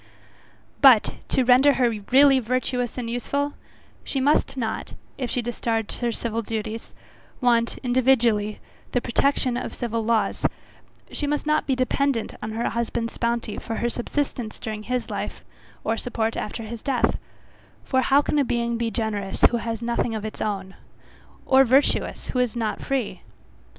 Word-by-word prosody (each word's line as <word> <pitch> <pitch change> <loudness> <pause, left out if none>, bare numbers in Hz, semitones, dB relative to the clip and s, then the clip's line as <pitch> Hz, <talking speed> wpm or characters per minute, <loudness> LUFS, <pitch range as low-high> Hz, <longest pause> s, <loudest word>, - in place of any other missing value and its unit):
But, 255 -6 +7
to 260 - +2
render 255 +3 +6
her 255 -3 +3 0.2
really 270 0 +7
virtuous 250 0 -1
and 245 -2 -3
useful, 280 +5 -2 0.5
she 270 - -1
must 275 0 +2
not, 225 -3 -3 0.3
if 250 -3 -2
she 245 - 0
discharge 225 -2 -2
her 240 -1 0
civil 230 0 -2
duties, 220 0 -5 0.5
want, 235 -2 +2
individually, 240 -4 +2 0.3
the 245 - +3
protection 250 +1 +1
of - - -5
civil 230 -2 -2
laws; 225 0 0 0.7
she 290 - -1
must 295 +1 -1
not 305 0 +1
be 265 - +2
dependent 255 -1 0
on 215 0 -4
her 230 +2 -1
husband's 235 0 -2
bounty 235 -2 -1
for 225 - -5
her 240 - 0
subsistence 245 -2 -3
during 215 -1 -5
his 250 +2 -3
life, - - -5 0.4
or 225 - 0
support 225 -1 -2
after 215 +2 -4
his 225 +1 -7
death 270 -3 +1 0.6
for 260 -1 +1
how 280 +2 +4
can 295 - +1
a - - +4
being 235 -2 -1
be 235 -1 0
generous 210 -4 -3
who 240 - +1
has 230 -1 -4
nothing 235 -1 0
of 215 0 -4
its 215 - -6
own? 195 -3 -3 0.7
or, 265 0 +6
virtuous, 270 +3 +2
who 250 - -1
is 250 -2 +1
not 225 -2 -2
free? 265 -5 -2
235 Hz, 160 wpm, -24 LUFS, 225-260 Hz, 0.7 s, But